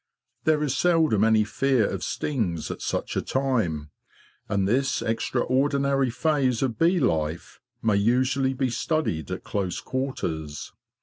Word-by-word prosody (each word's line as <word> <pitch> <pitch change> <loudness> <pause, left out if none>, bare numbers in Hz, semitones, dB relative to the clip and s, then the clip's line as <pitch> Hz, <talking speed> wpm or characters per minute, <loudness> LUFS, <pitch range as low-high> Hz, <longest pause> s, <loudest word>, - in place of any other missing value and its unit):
There 155 -1 +3
is 140 -3 0
seldom 160 - +3
any 110 -1 +4
fear 125 +1 +1
of - - -4
stings 105 - -2
at - - -7
such - - -2
a - - +1
time, 110 - -1 0.6
and 100 -2 +1
this 130 +2 +1
extraordinary 135 +4 +1
phase 135 -2 +1
of 125 -4 -2
bee 175 +2 +4
life 80 - -1 0.2
may 110 -3 +3
usually 130 +5 +2
be 130 -1 0
studied 115 - -1
at - - -5
close 95 -3 -2
quarters. 80 - -4
125 Hz, 135 wpm, -25 LUFS, 100-140 Hz, 0.6 s, any